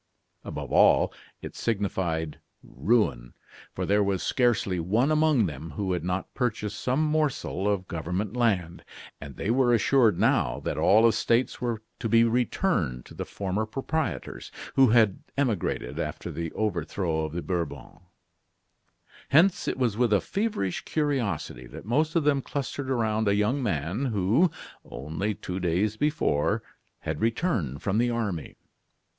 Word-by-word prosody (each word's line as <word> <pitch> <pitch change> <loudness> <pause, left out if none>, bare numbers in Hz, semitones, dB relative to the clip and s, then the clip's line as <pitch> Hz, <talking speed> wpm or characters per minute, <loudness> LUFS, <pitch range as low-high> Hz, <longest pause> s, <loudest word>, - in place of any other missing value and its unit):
Above - - -6
all, - - +5 0.3
it - - -7
signified 95 -8 -2 0.2
ruin 65 - 0 0.4
for - - -2
there 105 +1 +3
was 100 -2 -1
scarcely 115 -7 +1
one 110 - +1
among 155 -7 +3
them 80 -1 -5
who 95 0 -2
had 90 - -2
not 90 +2 -3
purchased 110 -4 -2
some 130 +5 +1
morsel 150 - 0
of 95 -2 -2
government 90 +6 -3
land; 95 -8 0 0.4
and 70 -1 -8
they 105 - -1
were 125 0 +3
assured 115 -3 +3
now - - +2
that - - -3
all 110 +3 +5
estates 115 +3 +1
were 115 -3 -2 0.2
to 115 - -2
be 115 +1 +5
returned 115 - 0
to - - -13
the - - -5
former 100 +2 -2
proprietors, 135 +7 -3 0.2
who 135 -1 +6
had 110 -4 +4 0.2
emigrated 120 - -1
after - - -4
the 85 -1 -4
overthrow 85 -4 -1
of 80 -1 -4
the 85 - -3
Bourbons. 85 -3 -4 1.3
Hence, 170 +7 +4
it - - -1
was 120 -5 0
with 120 -2 +2
a 105 - +5
feverish 195 - -2
curiosity 130 - -2
that - - -10
most 150 +8 +1
of 165 - +3
them 145 -2 +2
clustered 135 0 -4
around 110 -4 +1
a 100 - +3
young 110 +7 +1
man 95 - -1
who, 115 - +2 0.3
only 80 - -4
two 90 0 -5
days 90 +4 0
before, 145 - +1 0.4
had 80 -1 -4
returned 110 - -1
from 105 +2 +1
the 120 +1 +2
army. 105 -9 -3
105 Hz, 150 wpm, -27 LUFS, 90-125 Hz, 1.3 s, who